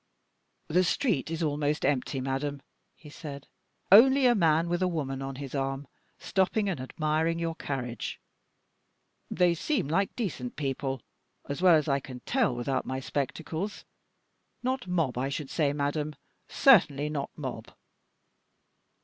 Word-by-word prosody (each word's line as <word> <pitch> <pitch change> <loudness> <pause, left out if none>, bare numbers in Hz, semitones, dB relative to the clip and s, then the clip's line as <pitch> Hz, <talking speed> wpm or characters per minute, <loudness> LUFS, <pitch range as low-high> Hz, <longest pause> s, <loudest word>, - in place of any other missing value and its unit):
"The 180 +4 +3
street 185 - 0
is 165 0 -2
almost 150 -1 0
empty, 135 -1 0
madame," 135 +1 -3 0.3
he 150 - -14
said. 145 -4 -8 0.5
"Only 265 +6 +8
a 245 - +6
man 165 -5 +3
with 175 +1 -1
a 185 - +3
woman 140 -6 -3
on 135 0 -4
his 135 -1 -7
arm, 135 0 -2 0.3
stopping 200 +2 +1
and 185 -8 -2
admiring 155 +4 0
your 165 -1 -2
carriage. 125 -8 -4 1.1
They 175 -1 +3
seem 250 - -1
like 190 +6 0
decent 150 - -4
people, 135 -2 -3 0.4
as 140 +4 -4
well 180 -3 +7
as 155 0 +1
I 140 -1 +2
can 130 -2 -10
tell 240 - +1
without 130 +2 -1
my 130 0 -3
spectacles. 160 +8 -4 0.8
Not 255 -4 -1
mob, 165 -9 0
I 135 +2 -1
should 140 0 -4
say, 150 -4 +2
madame; 150 +1 -2 0.3
certainly 150 - +5
not 145 -2 -3
mob!" 130 -6 -6
150 Hz, 140 wpm, -29 LUFS, 135-175 Hz, 1.1 s, Only